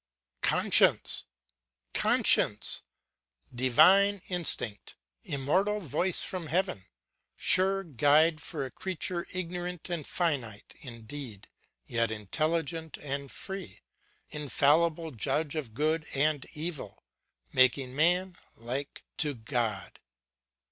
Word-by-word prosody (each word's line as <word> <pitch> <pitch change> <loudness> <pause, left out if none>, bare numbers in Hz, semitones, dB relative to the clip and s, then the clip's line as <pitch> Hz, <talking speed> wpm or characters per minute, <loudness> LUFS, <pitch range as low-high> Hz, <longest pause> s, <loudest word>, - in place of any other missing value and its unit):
Conscience! - - +4 0.7
Conscience! - - +3 0.7
Divine 185 +11 +4
instinct, 165 - 0 0.3
immortal 185 +10 0
voice 180 +1 +2
from 180 -4 -3
heaven; 175 - -1 0.5
sure 195 +1 +2
guide 155 +1 +3
for 135 - -4
a 130 - -8
creature 180 -1 -3
ignorant 180 -1 -5
and 165 -4 -4
finite 130 - -3
indeed, 115 -2 -8 0.4
yet 115 - 0
intelligent 160 - -2
and 140 -1 -5
free; 190 - -5 0.5
infallible 155 +3 +1
judge 145 +5 -1
of 130 -8 -5
good 155 +3 0
and 145 0 +1
evil, 155 - -6 0.5
making 130 0 +3
man 180 +4 +2 0.2
like 130 +5 -4
to 150 -3 0
God! 110 -5 -3
150 Hz, 95 wpm, -29 LUFS, 130-175 Hz, 0.7 s, Conscience